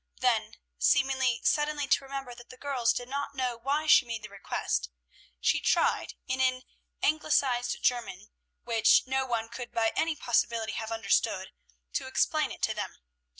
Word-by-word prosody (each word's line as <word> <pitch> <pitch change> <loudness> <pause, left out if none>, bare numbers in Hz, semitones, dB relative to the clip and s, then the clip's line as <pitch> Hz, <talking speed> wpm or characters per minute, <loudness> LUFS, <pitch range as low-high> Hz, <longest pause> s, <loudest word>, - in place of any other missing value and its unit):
Then, 225 -3 +1 0.2
seeming 270 -2 +3 0.2
suddenly 295 -1 +1
to 275 - +3
remember 270 -2 -6
that 240 0 -14
the 255 - -12
girls 255 -4 +1
did 245 - -4
not 280 +1 -4
know 255 -2 -1
why 275 +6 -1
she 295 - +7
made 230 -3 -5
the 210 - -8
request, 195 - -2 0.5
she - - +2
tried - - +1
in 260 0 -1
an 255 0 +1 0.4
anglicized 275 -5 +1
German, 230 -5 -1 0.3
which 230 -2 +4
no 265 0 -1
one 230 -2 -1
could 240 +1 -8
by 230 -2 +1
any 325 -1 +1
possibility 235 -4 0
have 220 0 -4
understood, 200 -3 0 0.4
to - - -2
explain - - +1
it - - -10
to - - +2
them. - - -5
245 Hz, 160 wpm, -29 LUFS, 230-270 Hz, 0.5 s, she